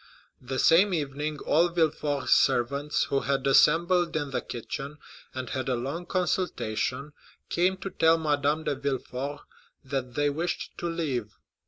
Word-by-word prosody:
The 130 +1 -4
same 180 +7 +5
evening 150 0 -3
all 170 +3 +4
Villefort's 150 -5 +1
servants, 140 +5 +2
who 140 - +3
had 135 0 -1
assembled 170 +5 +4
in 145 -3 -3
the - - -1
kitchen, 135 +5 -6 0.4
and 130 -2 -5
had 130 0 -2
a 125 - +1
long 140 +9 -4
consultation, 145 - -1 0.4
came 185 +2 +1
to 185 +1 -6
tell 165 0 +4
Madame 150 0 0
de - - 0
Villefort 140 +1 -4 0.4
that 130 -2 -4
they 145 0 +2
wished 165 +5 -3
to 175 - -2
leave. 140 -11 -3
145 Hz, 145 wpm, -27 LUFS, 135-165 Hz, 0.4 s, same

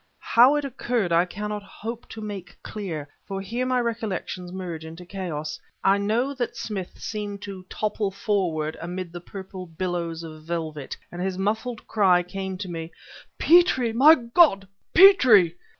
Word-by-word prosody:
How 250 +5 +7
it 295 -1 -1
occurred 240 -7 -1
I 170 +1 +4
cannot 210 +3 -5
hope 225 +3 -8
to 220 - -8
make 205 -4 -7
dear, 170 -9 -5 0.2
for 195 -1 -4
here 235 +6 -3
my 255 -1 +2
recollections 215 -6 -3
merge 180 -4 -6
into 165 +2 -9
a - - -15
chaos. 170 -5 -5 0.2
I 195 +1 +4
know 230 +7 0
that 250 -3 -3
Smith 195 -5 -5
seemed 205 -2 -5
to 190 -2 -8
topple 210 -1 -1
forward 180 -6 -1
amid 175 0 -5
the 175 - -7
purple 190 0 -8
billows 170 -1 -3
of 155 -1 -9
velvet, 155 -3 -4
and 175 - -6
his 185 0 -2
muffled 220 +4 -2
cry 190 -5 +4
came 190 +1 -5
to 190 0 -5
me: 165 -1 -6 0.5
"Petrie! 305 -9 +4
My 290 +7 +8
God, 235 - +3 0.3
Petrie!"... 255 - +7
195 Hz, 160 wpm, -25 LUFS, 175-225 Hz, 0.5 s, My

